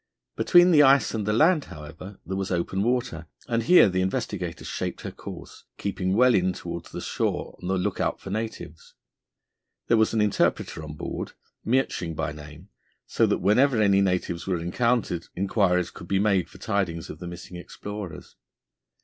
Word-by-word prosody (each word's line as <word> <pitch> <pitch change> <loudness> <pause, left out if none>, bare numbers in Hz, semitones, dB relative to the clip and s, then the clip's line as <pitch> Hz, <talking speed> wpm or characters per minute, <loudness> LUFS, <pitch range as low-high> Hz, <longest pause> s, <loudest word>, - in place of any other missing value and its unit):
Between 175 0 +5
the 150 -3 +7
ice 135 -1 +5
and 105 -3 -2
the - - +2
land, 155 +7 +4
however, 85 +4 -10
there 95 - -4
was 95 -1 -2
open 90 +2 -1
water, 125 +2 -1 0.2
and 115 -1 0
here 175 +3 +7
the 95 -1 0
Investigator 95 -4 -3
shaped - - -4
her - - -6
course, - - -10
keeping 95 -1 -1
well 125 +2 +5
in 95 -2 +2
towards - - -7
the - - -6
shore - - -2
on 90 - -6
the 95 0 +1
look 90 - -2
out - - -1
for 95 - -8
natives. 110 -7 -6 0.9
There 115 - +5
was 110 0 +3
an - - +2
interpreter 105 -5 0
on 75 -1 -8
board, - - -5 0.3
Miertsching 110 -9 0
by 75 - -2
name, 75 +5 -12 0.4
so - - +2
that - - 0
whenever 120 +5 +4
any 100 -2 +4
natives 90 -2 -1
were 95 -2 0
encountered 90 +1 0
inquiries 95 -2 +1
could - - -11
be 95 - +1
made 100 -2 +2
for - - -14
tidings 95 -6 -2
of 80 - -11
the 90 - -7
missing 85 +1 -9
explorers. 100 +1 -8
95 Hz, 175 wpm, -25 LUFS, 90-115 Hz, 0.9 s, the